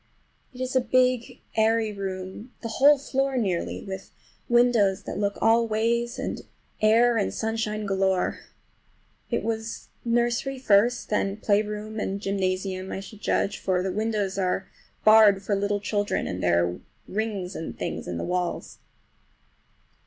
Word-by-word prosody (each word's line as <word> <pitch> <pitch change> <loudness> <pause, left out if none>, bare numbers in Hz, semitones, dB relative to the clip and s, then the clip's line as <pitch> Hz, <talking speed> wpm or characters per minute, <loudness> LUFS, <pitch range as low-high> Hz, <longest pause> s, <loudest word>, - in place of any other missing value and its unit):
It 250 - -13
is 255 0 -3
a 260 - +5
big, 250 0 +1
airy 220 0 +2
room, 190 +3 -6
the - - -2
whole 285 +6 +6
floor 270 -1 -1
nearly, 190 -7 -1
with 190 -1 -7 0.4
windows 240 -5 +3
that - - -5
look 200 -1 -1
all 230 +1 +4
ways, 235 +2 0
and - - -4 0.4
air 230 +2 +5
and 205 - 0
sunshine 220 -1 -2
galore. 190 -2 +1 0.9
It - - -1
was 220 0 -4
nursery 240 +3 0
first 235 -1 +2
and 195 -1 +1
then - - -9
playground 210 +1 -1
and 195 +1 -2
gymnasium, 190 -1 -2
I - - -3
should 205 +2 -11
judge; 200 - 0
for 180 -1 0
the 190 - -1
windows 210 -1 -1
are 185 0 0 0.4
barred 215 -2 +7
for 205 - -1
little 205 +1 0
children, 205 0 -1
and 90 0 -4
there 85 0 +3
are 90 +1 -4 0.3
rings 200 -3 -3
and 160 - -6
things - - -4
in 85 - -3
the - - -3
walls. 180 -1 -3
210 Hz, 150 wpm, -26 LUFS, 195-230 Hz, 0.9 s, barred